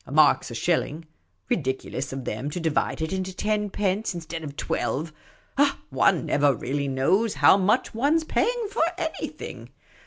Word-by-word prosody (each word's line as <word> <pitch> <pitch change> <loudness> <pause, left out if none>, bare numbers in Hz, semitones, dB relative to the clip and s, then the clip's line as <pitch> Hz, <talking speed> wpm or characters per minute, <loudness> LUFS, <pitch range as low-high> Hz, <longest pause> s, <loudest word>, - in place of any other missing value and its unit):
A - - -10
mark - - +5
's - - -7
a - - -7
shilling; 160 +3 0 0.4
ridiculous 135 - -2
of 135 -1 -5
them 125 +7 -3
to 165 - -4
divide 160 0 0
it 160 - -2
into 190 -1 -3
ten 210 0 0
pence 195 0 -1
in 170 - -4
stead 165 0 -6
of 145 -2 -7
twelve; 155 +3 -2 0.8
one 145 +6 +3
never 140 -2 +3
really 140 +4 -2
knows 185 +12 +2
how - - +7
much 200 +5 +2
one 280 +8 +3
's 325 - -1
paying 475 +7 0
for 425 - -1 0.2
anything. 320 -3 -5
170 Hz, 175 wpm, -25 LUFS, 140-210 Hz, 0.8 s, how